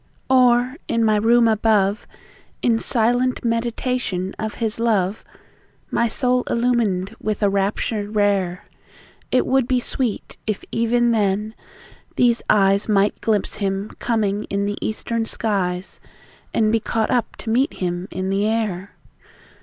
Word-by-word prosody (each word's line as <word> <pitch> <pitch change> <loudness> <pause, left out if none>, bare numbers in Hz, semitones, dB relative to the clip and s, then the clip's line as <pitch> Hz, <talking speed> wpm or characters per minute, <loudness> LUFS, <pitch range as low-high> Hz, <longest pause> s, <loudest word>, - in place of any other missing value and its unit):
Or, 250 +1 +4
in 230 0 +1
my 215 -1 +3
room 230 +2 +4
above, 215 -2 +2 0.6
In 230 -2 +3
silent 245 +2 +1
meditation 230 -4 -1
of 215 -1 -3
His 225 -1 -2
love, 210 -4 0 0.7
My 235 - +2
soul 250 +2 +1
illumined 225 -5 0
with 215 0 -2
a 200 - +3
rapture 205 +1 -1
rare. 200 -4 0 0.7
It 255 - +3
would 265 -2 +2
be 255 -1 +2
sweet, 245 -2 -3
if 215 -2 -2
even 235 +1 +2
then, 210 0 0 0.6
these 240 -1 +3
eyes 200 0 +3
Might 205 0 +2
glimpse 210 -3 0
Him 195 0 -2
coming 215 -3 0
in 200 0 -2
the 205 0 -3
East 220 +2 -4
ern 230 -1 +1
skies, 190 -5 -2 0.5
And 215 -1 +2
be 225 - +2
caught 220 0 -1
up 245 -3 0
to 220 - -5
meet 260 +6 +2
Him 175 0 -3
in 185 +1 -3
the 200 +2 +1
air. 210 -4 -2
220 Hz, 140 wpm, -21 LUFS, 200-235 Hz, 0.7 s, Or